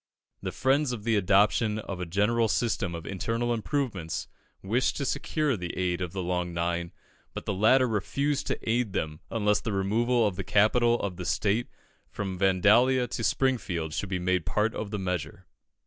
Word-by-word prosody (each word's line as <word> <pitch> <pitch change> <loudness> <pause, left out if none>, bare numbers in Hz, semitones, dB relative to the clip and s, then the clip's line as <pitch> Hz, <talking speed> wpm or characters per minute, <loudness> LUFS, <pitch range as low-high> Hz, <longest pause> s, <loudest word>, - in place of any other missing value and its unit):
The - - -3
friends 135 +1 +1
of 110 -4 -6
the 115 0 +2
adoption 105 +2 +3
of 100 -4 -5
a 90 - -4
general 105 +6 +2
system 100 -6 0
of 85 -1 -7
internal 115 +5 -1
improvements 110 - -2 0.4
wished 115 +7 +1
to 140 - -2
secure 150 0 0
the 90 -4 -6
aid 90 -1 -1
of 90 -3 -3
the 95 -1 -4
Long 90 -1 -2
Nine, 85 0 -1 0.4
but - - -6
the - - -1
latter 125 +7 +4
refused 140 +6 -1
to - - -1
aid 115 -2 +1
them 75 0 -3
unless 105 -2 +1
the 110 - -3
removal 115 +5 +2
of 100 -4 -1
the 95 - -2
capital 120 +4 +3
of 95 -3 -3
the 90 - -5
state 110 +6 0 0.4
from 95 -3 -5
Vandalia 105 +7 +4
to 115 - -4
Springfield 95 - 0
should 100 - -3
be 95 - -1
made 90 0 +1
a - - -24
part 105 +1 0
of 105 - -4
the 105 - -3
measure. 90 -4 -4
105 Hz, 185 wpm, -28 LUFS, 90-120 Hz, 0.4 s, latter